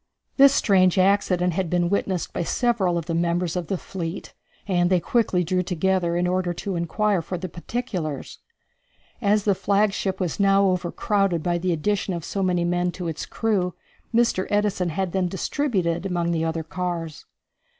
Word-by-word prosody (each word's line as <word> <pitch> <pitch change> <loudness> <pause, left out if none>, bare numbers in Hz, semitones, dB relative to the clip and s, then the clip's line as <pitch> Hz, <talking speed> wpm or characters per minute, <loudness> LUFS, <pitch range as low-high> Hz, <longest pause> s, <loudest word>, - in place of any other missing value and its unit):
This 275 0 +8
strange 190 -8 +3
accident 185 -2 +2
had 185 0 -1
been 175 0 +1
witnessed 190 -1 -1
by - - -2
several 190 -2 +1
of 165 - -3
the 165 - -3
members 170 +1 0
of 175 -3 -3
the 190 - -1
fleet, 175 -1 -6 0.3
and 175 -2 +2
they 185 -1 +3
quickly 185 -1 +1
drew 180 +2 0
together, 180 -1 0
in 175 +1 +1
order 180 0 0
to 195 +2 -4
inquire 185 +3 0
for 180 +3 -5
the 185 +2 -5
particulars. 175 - -5 0.8
As 210 -1 +2
the 205 - +3
flagship 200 -1 0
was 180 -1 -2
now 195 0 +4
overcrowded 185 -1 0
by 175 -1 0
the 180 +1 0
addition 190 +3 -1
of 170 - -6
so 195 - -3
many 180 -2 +1
men 175 0 0
to 180 -2 -5
its 160 -2 -4
crew, 190 -6 -1 0.4
Mr. 230 -5 +2
Edison 205 -4 +1
had 185 +3 -2
them 185 -1 0
distributed 185 - -1
among 170 -2 -1
the 165 -1 0
other 160 0 -2
cars. 170 -2 -4
180 Hz, 170 wpm, -24 LUFS, 170-195 Hz, 0.8 s, This